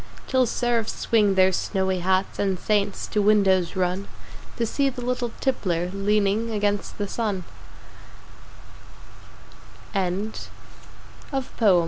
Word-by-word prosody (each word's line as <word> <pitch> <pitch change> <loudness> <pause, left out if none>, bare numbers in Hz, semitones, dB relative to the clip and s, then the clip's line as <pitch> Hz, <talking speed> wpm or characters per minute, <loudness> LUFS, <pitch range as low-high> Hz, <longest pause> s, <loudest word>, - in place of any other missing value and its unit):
Till 260 -2 +2
Seraphs 235 -1 0
swing 210 -4 +3
their 190 0 +5
snowy 190 0 0
Hats 190 +2 0
And 195 -2 +1
Saints 205 +1 0
to 210 - 0
windows 195 -4 +3
run 185 +1 -1 0.5
To 235 - +1
see 275 +5 +1
the 250 -2 -6
little 245 -1 -1
Tippler 180 -9 0
Leaning 205 +2 +1
against 205 -2 -1
the 205 - -2
Sun 205 -4 -2 2.5
Emily 195 +2 -1 1.0
Dickinso 230 -8 +2
205 Hz, 110 wpm, -24 LUFS, 190-230 Hz, 2.5 s, their